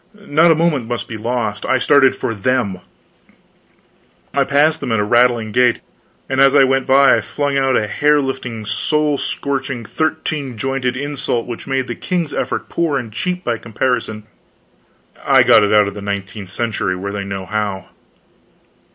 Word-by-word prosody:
Not 170 -5 +2
a 165 - +5
moment 155 -7 0
must 120 -1 -4
be 115 - -7
lost. 110 -1 -3
I 130 - +1
started 135 0 +4
for 115 - -3
them. 110 -3 -1 1.5
I 140 - +3
passed 150 +4 +2
them 125 - -4
at 110 - +1
a - - +2
rattling 120 0 +2
gait, 125 +1 +3 0.5
and 135 0 0
as 135 +1 +5
I 140 - +7
went 135 0 +1
by 135 +1 +5
I - - -1
flung 145 -1 -2
out 135 -2 +2
a 105 - 0
hair 150 +7 +2
lifting 125 -5 -4
soul 150 +6 0
scorching 135 -4 -3
thirteen 155 -3 -3
jointed 130 0 -2
insult 140 -4 -3
which 120 +2 -8
made 135 -1 -1
the - - -5
king's 170 -5 -3
effort - - -3
poor 165 -4 -1
and 115 -5 -6
cheap 180 - -3
by 115 -2 -2
comparison. 115 -1 -2 1.0
I - - +5
got 110 - +6
it 100 - +1
out 105 -1 +5
of 100 - -5
the 105 - -8
nineteenth 100 0 -5
century 105 -3 -2
where 100 +2 -5
they 100 -1 -3
know 95 -1 -5
how. 105 -2 -3
125 Hz, 175 wpm, -18 LUFS, 110-140 Hz, 1.5 s, I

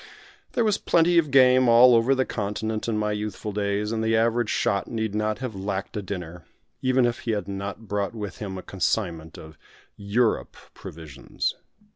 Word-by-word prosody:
There 235 - +2
was 210 -2 +1
plenty 170 +1 +3
of 155 -3 0
game 130 -2 +5
all 120 +2 +7
over 120 +4 +4
the 130 0 +1
continent 110 +1 -3
in 115 -2 0
my 105 0 0
youthful 105 +1 -4
days, 105 +1 -1
and 110 -1 -1
the 110 0 +2
average 115 0 +1
shot 100 -5 0
need 110 -2 -3
not 110 0 -1
have 130 -4 -5
lacked 95 +2 -4
a 105 - -2
dinner, 90 -3 -7 0.4
even 130 -1 +3
if 120 0 -1
he 115 - -2
had 100 -3 -3
not 100 +2 -6
brought 100 +2 -2
with 105 -2 -6
him 95 -3 -5
a 95 - -7
consignment 85 -4 -2
of 80 0 -12 0.4
"Europe" 110 +3 0 0.2
provisions. 80 -4 -5
105 Hz, 180 wpm, -25 LUFS, 100-120 Hz, 0.4 s, all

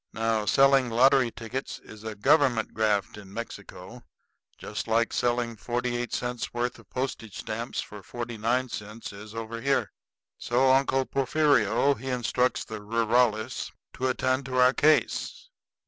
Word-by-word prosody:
Now, 110 -1 0
selling 135 0 +5
lottery 130 +2 +4
tickets 115 +4 -6
is 110 0 -14
a 110 -1 -5
government 130 -1 +3
graft 105 -2 0
in 100 -2 -13
Mexico, 105 0 -8 0.6
just 105 - -5
like 115 +1 +1
selling 120 -1 0
forty 120 +2 -2
eight 120 0 -3
cents' 120 -1 -3
worth 120 0 -2
of 115 - -19
postage 125 -5 -4
stamps 115 +3 -4
for 105 -1 -10
forty 120 +3 -6
nine 120 +4 0
cents 105 -1 -7
is 105 +2 -11
over 115 0 -5
here. 140 +2 +1 0.5
So 130 +2 +3
Uncle 135 0 +3
Porfirio 140 -2 +2
he 130 +1 -7
instructs 125 0 0
the 110 -2 -7
rurales 115 0 +1 0.2
to 130 - -2
attend 130 +1 0
to 130 -1 -3
our 125 +1 +6
case. 155 - +1
120 Hz, 145 wpm, -27 LUFS, 110-130 Hz, 0.6 s, our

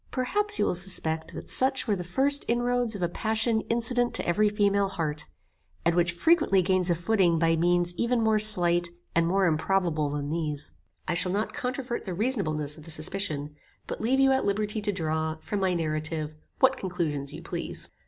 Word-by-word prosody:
Perhaps 415 +12 +2
you - - +1
will - - 0
suspect 165 -3 +3
that - - -8
such 260 0 +4
were 210 - +1
the 180 - -6
first 270 +11 +2
inroads 240 -1 0
of 190 - -5
a - - +2
passion 220 +4 0
incident 240 +1 +1
to - - +3
every 210 +5 +2
female 200 -1 +1
heart, 155 -5 -3 0.6
and 170 - +2
which 175 0 +1
frequently 195 - +2
gains 185 0 +1
a 175 - +2
footing 175 -1 +1
by 165 0 +2
means 175 +1 +1
even 235 +1 0
more 220 -1 +2
slight, 175 -5 +6 0.2
and 165 0 +1
more 190 +2 +1
improbable 160 -2 0
than 145 0 -4
these. 150 -3 -1 0.4
I - - -1
shall 180 +1 0
not 205 +3 -2
controvert 255 -3 -5
the 185 -3 -5
reasonableness 160 - -2
of 155 - -14
the - - -10
suspicion, 155 -2 -4 0.3
but - - -7
leave 255 +5 +1
you 270 0 +4
at 265 - +1
liberty 210 +2 -2
to 205 0 -1
draw, 160 -3 -3
from 195 +6 -5
my 190 -2 0
narrative, 155 -1 -3 0.2
what 265 0 +3
conclusions 155 -7 -4
you 160 +3 -10
please. 170 0 -6
185 Hz, 190 wpm, -26 LUFS, 165-220 Hz, 0.6 s, slight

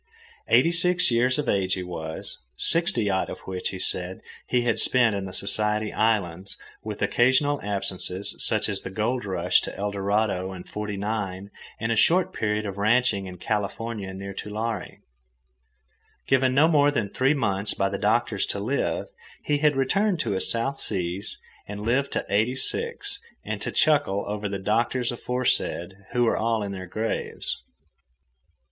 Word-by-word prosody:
Eighty 165 - +5
six 180 -2 +3
years 125 +3 +3
of 150 -3 -2
age 95 -3 +2
he 90 - -4
was, 80 -3 -5 0.2
sixty 145 - +3
odd 95 -1 0
of - - -5
which, 95 -1 -3
he 95 - -5
said, 90 0 -1 0.3
he 125 -1 +2
had 115 -2 +1
spent 120 -4 +3
in 100 -1 -3
the 95 - -6
Society 105 +3 -1
Islands, 100 -4 0 0.3
with - - -4
occasional 130 +4 +3
absences, 95 -1 -1
such - - +3
as - - +1
the - - -6
gold 110 +4 -1
rush 90 -2 +2
to - - -6
Eldorado 100 -1 0
in 90 -1 -8
'forty 105 -1 -5
nine 100 -2 -3 0.3
and 115 +1 -1
a - - +2
short 180 +10 +4
period 105 0 -1
of 100 -1 -5
ranching 110 -2 +2
in 90 -1 -8
California 105 +1 -3
near 100 +1 -6
Tulare. 105 0 -4 1.2
Given 130 -1 +3
no 150 +3 +6
more 145 -3 +5
than 115 -8 0
three 135 +7 +2
months 105 -6 0
by 95 - +1
the 100 - -3
doctors 110 -1 +1
to 100 - -2
live, 125 +8 -1 0.4
he 145 -1 +1
had 150 -1 +3
returned 185 +8 +2
to - - -1
his 95 -1 0
South 135 +4 0
Seas 90 +1 -2 0.3
and 105 0 -6
lived 125 +6 +1
to - - -1
eighty 110 +5 +2
six 465 - -2 0.3
and - - -3
to - - -2
chuckle 145 -10 +2
over 105 0 -3
the 100 - -2
doctors 115 +5 0
aforesaid, 120 -7 -1 0.2
who 120 - +2
were 115 - +2
all 115 -1 +1
in 100 - -4
their 95 -1 -6
graves. 110 +5 -3
105 Hz, 165 wpm, -25 LUFS, 95-125 Hz, 1.2 s, no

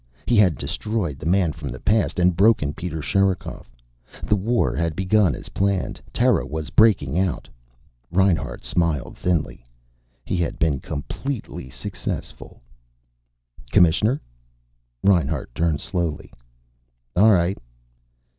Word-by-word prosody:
He 120 - +2
had 95 - +4
destroyed 95 - -3
the 80 - -5
man 90 -3 +2
from 75 -4 -7
the 65 +1 -7
past 105 -8 +1
and 90 -1 +3
broken 95 -7 +3
Peter 80 -3 -5
Sherikov. 95 -6 -1 0.5
The 105 - +2
war 115 +5 +1
had 80 +1 -1
begun 95 -2 +2
as - - -10
planned. 100 -1 -1
Terra - - +2
was 80 0 -5
breaking 90 -9 +4
out. 95 -3 -1 0.6
Reinhart 95 -1 +1
smiled 85 -6 -1
thinly. 85 -9 -1 0.6
He - - -1
had 85 -1 -1
been 75 -5 +1
completely 85 - -5
successful. - - -6 1.1
"Commissioner." 105 - +4 0.8
Reinhart 80 -10 +1
turned 80 -1 0
slowly. 85 -5 -3 0.8
"All 105 +5 +6
right." 90 0 +2
90 Hz, 115 wpm, -23 LUFS, 80-100 Hz, 1.1 s, All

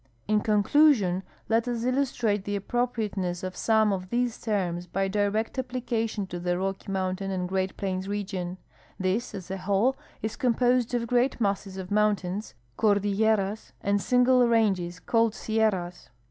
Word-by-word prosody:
In 215 0 +3
conclusion, 210 - +4 0.3
let 230 +1 +2
us 235 -2 -2
illustrate 245 -5 0
the 205 0 -2
a])pro])riateness 205 -6 -2
of 185 0 -4
some 220 -2 +3
of 185 -1 -4
these 240 0 -1
terms 180 -5 -1
by 195 +2 -1
direct 210 +5 0
application 235 -4 -2
to 175 -1 -6
tlie 175 0 0
Rocky 195 +1 -3
mountain 190 0 -2
and 185 -1 -2
Great 190 0 -2
Plains 190 -1 -2
region. 190 -3 -3 0.4
This, 190 +5 -1
as 185 -1 -7
a 190 - -2
Avhole, 200 +7 +2 0.3
is 220 0 -2
com])osed 245 0 +2
of 235 -1 0
great 245 +3 +1
masses 200 -2 -1
of 190 0 -7
mountains, 205 - 0 0.2
cordilleras, 205 0 +1
and 200 0 +1
single 250 +1 +4
ranges 190 -7 +1
called 225 +2 +1
sierras. 205 -6 -1
205 Hz, 145 wpm, -27 LUFS, 190-230 Hz, 0.4 s, conclusion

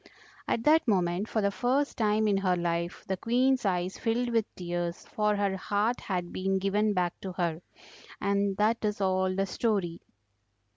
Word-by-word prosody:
At 230 - 0
that 315 +1 +4
moment, 185 0 +1
for 220 - 0
the 200 - +2
first 260 +7 0
time 215 -1 +2
in 200 -2 +3
her 185 -2 +2
life 170 0 -2
the 190 - -1
Queen's 255 +4 +2
eyes 180 0 -1
filled 240 +2 0
with 225 -2 +2
tears, 175 -1 -4
for 210 -1 0
her 200 -1 0
heart 205 +5 0
had 180 -3 -3
been 195 +1 0
given 205 +2 +1
back 175 -1 +1
to 190 -2 -5
her. 170 -2 -1 0.6
And 200 -1 0
that 220 +3 +2
is 210 -1 -1
all 185 -1 +1
the 195 0 +1
story." 195 -5 -1
200 Hz, 175 wpm, -29 LUFS, 180-220 Hz, 0.6 s, that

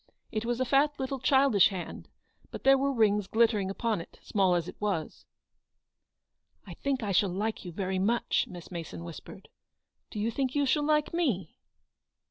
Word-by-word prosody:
It 215 +1 -2
was 240 +1 -1
a 260 - +1
fat 285 +3 +2
little 265 0 -3
childish 265 -6 +5
hand, 185 -3 -7 0.4
but - - -8
there 270 0 +7
were 275 +1 +1
rings 210 -5 +2
glittering 220 -4 +2
upon 215 -1 -1
it, - - -14
small 190 -3 +2
as 170 -1 -1
it - - -8
was. 195 -7 -3 1.4
"I - - -9
think 270 -3 -2
I 205 - -1
shall 195 +1 +3
like 210 +5 -3
you 175 - -6
very 190 +1 -2
much," 230 +5 +1
Miss 175 -1 -10
Mason 160 - -6
whispered. 85 - -10 0.3
" - - -54
Do 210 - -6
you 220 +3 0
think 260 +2 -2
you 285 -1 +2
shall 290 +2 +2
like 300 0 +2
me?" 245 - -1
220 Hz, 180 wpm, -29 LUFS, 190-270 Hz, 1.4 s, there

